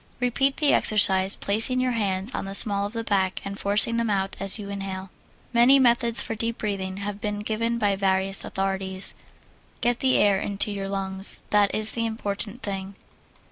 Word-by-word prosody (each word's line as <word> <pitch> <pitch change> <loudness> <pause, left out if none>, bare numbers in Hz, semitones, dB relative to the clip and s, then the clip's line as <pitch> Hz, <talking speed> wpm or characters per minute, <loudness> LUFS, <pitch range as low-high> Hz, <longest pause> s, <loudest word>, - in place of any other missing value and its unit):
Repeat 270 +3 0
the 295 -1 +3
exercise, 190 -2 +4
placing 225 +5 +1
your 255 0 0
hands 200 0 -2
on - - -4
the 195 0 -5
small 200 -1 +3
of 205 - -12
the 230 -1 -4
back 190 -3 0
and 200 0 -6
forcing 210 +3 +4
them 230 -1 -1
out 195 -1 -1
as 195 +1 +2
you 205 -2 -8
inhale. 195 -1 -6 0.4
Many 240 +4 +6
methods 235 -2 +3
for - - -4
deep 230 +1 -3
breathing 195 -3 -4
have 200 0 -6
been 210 0 -3
given 230 +2 -2
by 205 -3 +1
various 195 0 +1
authorities. 190 0 -3 0.7
Get 240 0 0
the 260 -1 +2
air 200 -2 +3
into 205 +1 -1
your 195 -1 -5
lungs 195 0 -1
that 205 -1 +2
is 215 0 +4
the 230 -1 -2
important 220 +1 -5
thing. 195 -1 -5
205 Hz, 180 wpm, -24 LUFS, 195-230 Hz, 0.7 s, Many